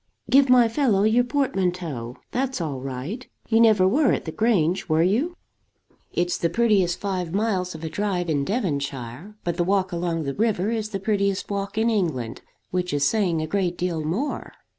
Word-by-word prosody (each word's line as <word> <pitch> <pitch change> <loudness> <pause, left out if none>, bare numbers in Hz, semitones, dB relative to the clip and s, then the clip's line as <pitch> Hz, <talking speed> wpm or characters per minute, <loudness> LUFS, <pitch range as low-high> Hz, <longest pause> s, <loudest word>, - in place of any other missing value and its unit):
"Give 275 0 +6
my 250 -2 +6
fellow 225 -5 +2
your 225 +3 +4
portmanteau. 180 - -2
That's 260 -1 -1
all 150 -6 -3
right. 135 - -5 0.2
You 225 -1 +4
never 215 -5 +5
were 270 +7 +3
at - - -2
the 160 - -4
Grange, 185 -6 +1
were 160 +1 +3
you? 250 - +1 0.8
It's 175 0 0
the 170 - +1
prettiest 190 -3 +2
five 185 -3 -3
miles 190 -5 0
of 160 - -9
a 160 - -3
drive 190 -2 -1
in 145 -3 +1
Devonshire; 140 - -3
but 170 -1 -2
the 175 - +2
walk 190 +1 +1
along 170 -2 -1
the 140 -1 -3
river 210 0 0
is 220 -2 -2
the 195 -3 -3
prettiest 200 -1 0
walk 200 +1 -3
in 225 +1 +2
England, 150 - -1 0.3
which 180 -2 -1
is 145 0 +2
saying 180 -8 +1
a - - -1
great 180 -1 -1
deal 175 -3 -2
more." 200 - -3
190 Hz, 185 wpm, -24 LUFS, 165-220 Hz, 0.8 s, Give